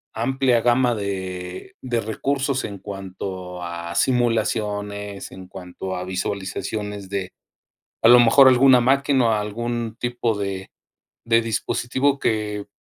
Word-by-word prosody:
amplia 125 Hz, 0 st, +1 dB
gama 120 Hz, 0 st, +3 dB
de 95 Hz, -3 st, -5 dB
de 120 Hz, -3 st, -1 dB
recursos 135 Hz, +5 st, -1 dB
en 100 Hz, -2 st, -7 dB
cuanto 95 Hz, -2 st, -7 dB
a 85 Hz, 0 st, -5 dB
simulaciones 105 Hz, -4 st, -1 dB
en 95 Hz, -1 st, -11 dB
cuanto 95 Hz, 0 st, -7 dB
a 90 Hz, -, -4 dB
visualizaciones 100 Hz, +2 st, -4 dB
de 95 Hz, -2 st, -3 dB, 0.7 s
a 115 Hz, -, +5 dB
lo 120 Hz, +1 st, +9 dB
mejor 130 Hz, +4 st, +7 dB
alguna 130 Hz, 0 st, +6 dB
máquina 135 Hz, 0 st, +3 dB
o -, -, +3 dB
algún 115 Hz, +2 st, -3 dB
tipo 120 Hz, -3 st, -1 dB
de 95 Hz, -1 st, -4 dB, 0.6 s
de 115 Hz, 0 st, +4 dB
dispositivo 130 Hz, +5 st, 0 dB
que 105 Hz, -3 st, -1 dB
105 Hz, 120 wpm, -22 LUFS, 95-120 Hz, 0.7 s, lo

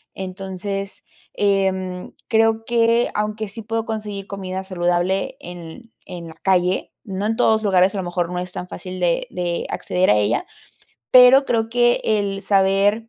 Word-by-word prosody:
Entonces, 195 Hz, +1 st, -5 dB, 0.3 s
em, 190 Hz, -2 st, 0 dB, 0.2 s
creo 225 Hz, 0 st, +2 dB
que 235 Hz, 0 st, +2 dB
aunque 210 Hz, +1 st, -2 dB
sí 215 Hz, +3 st, -7 dB
puedo 225 Hz, +1 st, -3 dB
conseguir 210 Hz, -3 st, -5 dB
comida 190 Hz, -1 st, -5 dB
saludable 180 Hz, +1 st, 0 dB
en 175 Hz, +1 st, -9 dB
en 170 Hz, +8 st, -12 dB
en 175 Hz, -2 st, -8 dB
la -, -, -10 dB
calle, 180 Hz, +1 st, +1 dB
no 195 Hz, -1 st, -4 dB
en 225 Hz, -, 0 dB
todos 220 Hz, -3 st, +3 dB
lugares. 190 Hz, -2 st, +3 dB
A -, -, -2 dB
lo 190 Hz, -, -2 dB
mejor 175 Hz, -1 st, -2 dB
no 180 Hz, -, -2 dB
es 180 Hz, 0 st, -5 dB
tan 180 Hz, -, -6 dB
fácil 185 Hz, 0 st, -7 dB
de 175 Hz, -2 st, 0 dB
de 175 Hz, -1 st, -2 dB
acceder 180 Hz, +1 st, 0 dB
a 105 Hz, -, +5 dB
ella, 105 Hz, +3 st, +1 dB, 0.7 s
pero 255 Hz, +2 st, +8 dB
creo 225 Hz, -1 st, 0 dB
que 240 Hz, 0 st, +3 dB
el 200 Hz, -2 st, 0 dB
saber 200 Hz, +3 st, +2 dB
195 Hz, 165 wpm, -21 LUFS, 180-220 Hz, 0.7 s, pero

